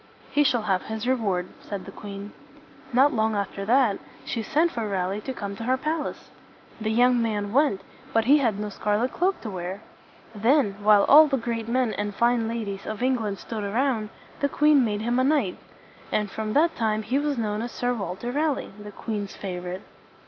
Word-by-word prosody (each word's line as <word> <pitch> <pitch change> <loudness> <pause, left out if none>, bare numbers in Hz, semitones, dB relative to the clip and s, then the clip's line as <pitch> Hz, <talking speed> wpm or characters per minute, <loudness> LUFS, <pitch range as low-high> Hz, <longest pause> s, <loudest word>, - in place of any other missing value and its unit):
"He 295 - +4
shall 245 -5 +2
have 190 -3 +1
his 220 +2 -4
reward," 200 -8 0
said 200 -2 -6
the 195 - -9
queen. 200 +1 -8 0.6
Not 265 +4 +4
long 220 -1 +1
after 200 -1 -3
that, 235 -2 +3 0.3
she 230 - -2
sent 320 +7 +2
for 225 -6 -3
Raleigh 195 +1 -1
to 265 - -5
come 200 -5 -5
to 230 - -6
her 255 +2 +2
pal 305 +3 -1
ace. - - -10 0.5
The 215 0 -2
young 245 +2 +4
man 210 -2 -1
went, 275 -8 +3 0.3
but 225 -3 +2
he 290 +4 +6
had 230 -7 +1
no 210 0 -3
scarlet 210 +5 -1
cloak 370 +2 +1
to 220 - -5
wear. 185 +2 -5 0.5
Then, 225 0 +2
while 205 -1 +6
all 305 +2 +8
the 275 -2 +1
great 230 -2 -3
men 245 -1 +1
and 205 -1 -3
fine 235 -1 +2
ladies 210 -4 -4
of 215 +2 -4
England 225 -6 0
stood 210 +4 -5
around, 225 +1 0 0.3
the 285 - +1
queen 295 -1 +4
made 210 -2 -1
him 240 +3 +1
a - - +3
knight. 270 -10 +1 0.5
And 210 -2 0
from 215 -1 -3
that 325 +3 +3
time 215 -1 0
he 250 +6 0
was 290 -2 -1
known 215 -2 -1
as 240 +1 -4
Sir 245 0 -1
Walter 200 +2 -4
Raleigh, 295 -3 -1
the 210 0 -9
queen's 205 -1 -5
favorite. 180 0 -5
225 Hz, 200 wpm, -25 LUFS, 205-255 Hz, 0.6 s, all